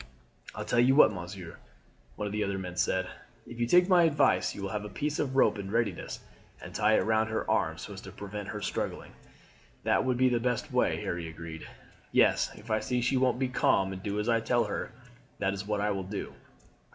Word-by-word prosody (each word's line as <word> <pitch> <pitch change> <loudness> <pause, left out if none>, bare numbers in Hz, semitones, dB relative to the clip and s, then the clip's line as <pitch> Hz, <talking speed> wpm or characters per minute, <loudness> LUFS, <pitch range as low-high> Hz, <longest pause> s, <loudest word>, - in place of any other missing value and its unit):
"I'll - - -5
tell 125 - +1
you 130 +3 +5
what, 140 - +7
monsieur," 90 -1 -8 0.6
one 105 - -4
of 105 - -3
the 105 0 0
other 100 0 -2
men 90 -2 -6
said; 95 +1 +1 0.4
"if 120 - -10
you 120 - +1
take 180 +6 +5
my 180 -3 +6
advice 145 - +2
you 100 - -6
will 95 - -3
have 105 0 -2
a 105 - -6
piece 150 +5 -2
of 135 -2 -1
rope 130 - +4
in 95 -1 -5
readiness 110 -4 -2 0.4
and - - -10
tie 110 +1 +3
it - - +3
round 110 0 +2
her 110 - -2
arms - - 0
so - - -7
as - - -9
to - - -10
prevent 105 0 -7
her 105 0 -5
struggling." - - -3 0.7
"That - - +2
would 130 -1 0
be 130 0 +4
the 120 -1 +1
best 125 0 -1
way," - - +2
Harry 85 -1 -3
agreed. 80 0 -8 0.4
"Yes, - - +4
if 110 +2 -10
I 110 - +3
see 125 +2 -1
she 120 +3 +1
won't 130 -1 +2
be 130 0 0
calm 95 -6 +2
and 95 - -7
do 100 +1 -2
as 105 - -2
I 115 -1 +3
tell 120 +1 +2
her, 105 +1 -4 0.5
that 100 0 0
is 100 +1 -6
what 105 -1 0
I 105 0 +1
will 95 -1 -2
do." 100 +2 -5
105 Hz, 230 wpm, -29 LUFS, 95-125 Hz, 0.7 s, what